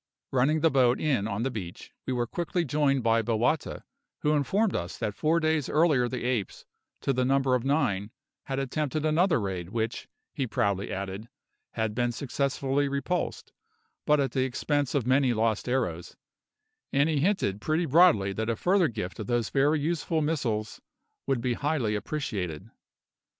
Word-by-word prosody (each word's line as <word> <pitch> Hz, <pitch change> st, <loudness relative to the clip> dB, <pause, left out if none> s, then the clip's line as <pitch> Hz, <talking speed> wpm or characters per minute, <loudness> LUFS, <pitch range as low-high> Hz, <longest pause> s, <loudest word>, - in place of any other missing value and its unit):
Running 140 Hz, +5 st, +2 dB
the 165 Hz, -, +4 dB
boat 125 Hz, -2 st, +3 dB
in 130 Hz, -10 st, +1 dB
on 110 Hz, +1 st, -2 dB
the 135 Hz, -, -1 dB
beach, 100 Hz, -4 st, -7 dB, 0.2 s
we 130 Hz, -, 0 dB
were 120 Hz, -1 st, 0 dB
quickly 170 Hz, +6 st, -2 dB
joined 140 Hz, -2 st, +1 dB
by 115 Hz, 0 st, +3 dB
Bowata, 120 Hz, +6 st, 0 dB, 0.4 s
who 150 Hz, -, +2 dB
informed 190 Hz, -, +1 dB
us 85 Hz, +1 st, -4 dB
that 105 Hz, -, -2 dB
four 160 Hz, +9 st, +1 dB
days 155 Hz, -3 st, 0 dB
earlier 150 Hz, -6 st, +3 dB
the 125 Hz, -, -4 dB
apes, 120 Hz, -6 st, -2 dB, 0.4 s
to 135 Hz, -, +1 dB
the 130 Hz, 0 st, +1 dB
number 135 Hz, 0 st, +2 dB
of 125 Hz, -2 st, +1 dB
nine, 105 Hz, -8 st, 0 dB, 0.4 s
had 135 Hz, -, -3 dB
attempted 145 Hz, +2 st, -2 dB
another 165 Hz, 0 st, +3 dB
raid 95 Hz, -4 st, -4 dB
which, 115 Hz, +2 st, -3 dB, 0.3 s
he 135 Hz, -5 st, -2 dB
proudly 100 Hz, -3 st, -1 dB
added, 100 Hz, +3 st, -5 dB, 0.4 s
had 110 Hz, -2 st, -1 dB
been 120 Hz, +2 st, 0 dB
successfully 140 Hz, +2 st, -1 dB
repulsed, 140 Hz, +6 st, -3 dB, 0.5 s
but 150 Hz, -1 st, +4 dB
at 135 Hz, -3 st, 0 dB
the 130 Hz, +1 st, +1 dB
expense 140 Hz, +2 st, -1 dB
of 135 Hz, -5 st, +1 dB
many 130 Hz, -1 st, +3 dB
lost 110 Hz, +1 st, 0 dB
arrows; 100 Hz, -10 st, -2 dB, 0.7 s
and 140 Hz, +2 st, +3 dB
he 155 Hz, -3 st, +1 dB
hinted 140 Hz, -, 0 dB
pretty 160 Hz, +5 st, 0 dB
broadly 150 Hz, -, +4 dB
that 110 Hz, +3 st, -2 dB
a 115 Hz, -, +1 dB
further 180 Hz, -, +3 dB
gift 105 Hz, -7 st, -5 dB
of 105 Hz, -, -5 dB
those 120 Hz, -2 st, 0 dB
very 145 Hz, +3 st, +3 dB
useful 160 Hz, +1 st, -1 dB
missiles 120 Hz, -9 st, -2 dB, 0.5 s
would 135 Hz, -3 st, +1 dB
be 125 Hz, 0 st, 0 dB
highly 140 Hz, -5 st, -1 dB
appreciated. 105 Hz, -, -4 dB
130 Hz, 165 wpm, -28 LUFS, 110-150 Hz, 0.7 s, the